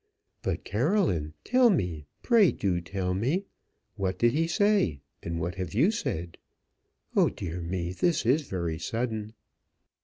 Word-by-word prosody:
"But, - - -2
Caroline, 105 - +1
tell 250 0 +5
me 90 - -1 0.2
pray 225 -7 +5
do 90 -3 -1
tell 90 +1 -2
me; 135 - 0 0.5
what 95 -1 -1
did 120 +3 +4
he 165 +3 +1
say, 195 - +2 0.2
and 85 0 -3
what 85 +2 -2
have 95 - -5
you 155 - +4
said? 85 - -4 0.8
Oh - - +5
dear 85 +1 -5
me, 85 +1 -3
this 165 - +1
is 140 +4 +2
very 85 -4 -2
sudden." 110 +1 -3
100 Hz, 145 wpm, -28 LUFS, -, 0.8 s, tell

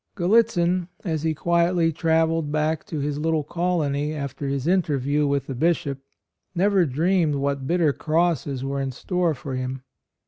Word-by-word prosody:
Gallitzin, 180 -3 +2 0.2
as 160 -5 -2
he 160 0 0
quietly 170 +1 +2
travelled 160 -1 +1
back 155 +1 0
to 160 - -4
his 145 0 -2
little 160 0 0
colony 155 -3 -1
after 140 -1 -4
his 135 -1 -2
interview 150 -5 +1
with 140 -1 0
the 135 - -5
Bishop, 140 -1 0 0.6
never 190 -1 +3
dreamed 160 +2 +1
what 140 -1 -2
bitter 165 -3 +2
crosses 155 -5 0
were 140 0 -2
in 135 - -2
store 175 +4 -1
for 135 +1 -7
him. 130 0 -4
155 Hz, 150 wpm, -24 LUFS, 140-170 Hz, 0.6 s, never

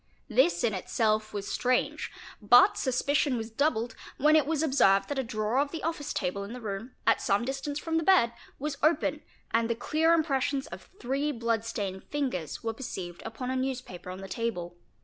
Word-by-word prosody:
This 350 - +3
in 230 -3 +2
itself 215 +3 0
was 200 -1 -4
strange, 255 0 0 0.3
but 245 +4 +7
suspicion 275 +1 +1
was 225 0 -5
doubled 235 -3 0 0.2
when 300 +3 +5
it 305 -3 +4
was 320 -1 +1
observed 195 -10 +4
that 285 - -1
a - - 0
drawer 225 +1 -1
of 285 0 +1
the 325 +1 -6
oftice 320 -3 -2
table 200 +2 -2
in 200 +3 -7
the 250 - -6
room, 220 +2 -5
at - - +4
some 205 +2 +1
distance 275 +2 -3
from 325 +1 -1
the 325 - +1
bed, 310 -11 +5 0.2
was 285 0 -4
open 310 +3 +2 0.3
and 230 0 +2
the 235 - +1
clear 315 +7 +2
impressions 275 -3 0
of - - -10
three 275 +4 -1
blood 230 -3 -1
stained 195 -4 -4
fingers 255 - -3
were 225 0 -1
perceived 185 -8 -6
upon 250 +3 -4
a - - -1
newspaper 255 -9 -4
on 185 +1 -7
the 195 - -7
table. 180 -7 -3
245 Hz, 190 wpm, -29 LUFS, 215-285 Hz, 0.3 s, but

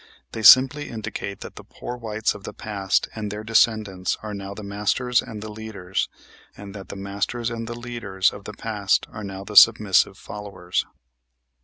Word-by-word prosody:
They 110 - -5
simply 130 +7 +7
indicate 105 -3 -6
that - - -9
the - - -9
poor 125 - -7
whites 110 -3 -1
of 105 - -11
the - - -8
past 100 -3 -1
and 105 -2 -4
their 105 +1 -6
descendants 110 -4 +2
are 105 -1 -5
now 100 0 -6
the 110 - -8
masters 105 +5 +1
and 110 -4 -8
the 110 - -7
leaders, 105 -4 -4 0.5
and 100 -1 -9
that 100 -2 -10
the - - -6
masters 100 +4 -3
and 115 0 -5
the 120 0 -6
leaders 115 -6 -1
of 100 - -11
the 105 - -7
past 105 -3 0
are 110 - -7
now 95 -1 -6
the 105 +1 -9
submissive 105 -3 +6
followers. 100 -4 -4
105 Hz, 180 wpm, -24 LUFS, 100-115 Hz, 0.5 s, simply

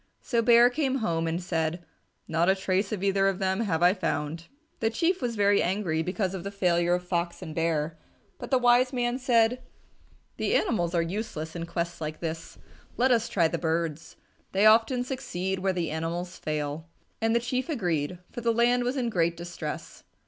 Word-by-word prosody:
So 235 -2 0
Bear 235 +1 +6
came 270 -1 0
home 165 -10 0
and 165 +1 -1
said, 165 0 -2 0.4
"Not 165 +3 +2
a 190 - +5
trace 190 +2 -1
of 200 -3 -3
either 195 0 +3
of 195 -1 0
them 190 0 0
have 180 -7 0
I 180 +1 +6
found." 165 -4 -3 0.3
The 225 - +1
Chief 335 +10 0
was 240 -2 -2
very 205 -1 +3
angry 175 -4 0
because 185 +2 -2
of 185 -3 -5
the 200 - -4
failure 175 -3 +2
of 180 0 -5
Fox 175 0 -2
and 160 -3 -7
Bear, 160 -1 -1 0.4
but - - -7
the 265 - +4
wise 245 +1 +4
man 245 -1 -1
said, 245 -1 +3 0.8
"The - - 0
animals 175 - +1
are 170 - +3
useless 165 -4 -5
in 170 - -4
a - - -3
quest 170 0 -3
like 155 0 -4
this. 165 -1 -5 0.4
Let 255 +2 +3
us 230 -2 +2
try 170 -4 +3
the - - -3
birds. 165 -1 -2 0.4
They 195 +2 +3
often 225 +3 +5
succeed 190 -8 -3
where 190 +1 +1
the 175 -4 -2
animals 170 +3 -3
fail." 155 +1 -3 0.3
And 225 +1 +2
the - - +4
Chief 255 +5 -2
agreed, 180 - -1
for 240 - -6
the 230 0 +2
land 240 +2 +3
was 250 +3 -1
in 250 -2 0
great 170 -4 +1
distress. 170 -3 -7
185 Hz, 195 wpm, -27 LUFS, 165-230 Hz, 0.8 s, Bear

